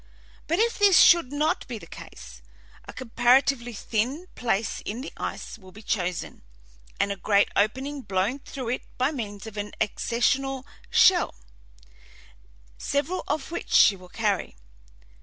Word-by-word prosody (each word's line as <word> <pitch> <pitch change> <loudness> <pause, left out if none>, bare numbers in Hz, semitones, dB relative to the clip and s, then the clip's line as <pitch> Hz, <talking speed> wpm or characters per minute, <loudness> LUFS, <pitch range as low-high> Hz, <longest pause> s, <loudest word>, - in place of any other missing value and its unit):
But 335 - +1
if 460 +2 +1
this 400 -3 +6
should 340 -7 +6
not 300 +2 0
be 240 - -5
the 195 - -11
case, 65 - -12 0.5
a - - -7
comparatively 245 +1 +2
thin 240 - -2
place 225 -2 -1
in 225 +4 -5
the 275 - -8
ice - - -6
will 185 -2 -15
be 215 +4 -14
chosen, 180 -4 -3 0.6
and 200 - +1
a - - -2
great 200 +1 +2
opening 265 +7 0
blown 200 +5 -1
through 260 -3 -6
it 250 - -1 0.2
by 255 +3 +1
means 205 -8 -6
of 220 -1 -9
an 205 0 -4
ascensional 260 +5 0 0.2
shell, 360 -2 +4 1.4
several 290 +6 -1
of 305 0 -3
which 345 - -5
she 205 - +6
will 180 -1 -15
carry. 205 - -1
240 Hz, 145 wpm, -26 LUFS, 205-280 Hz, 1.4 s, this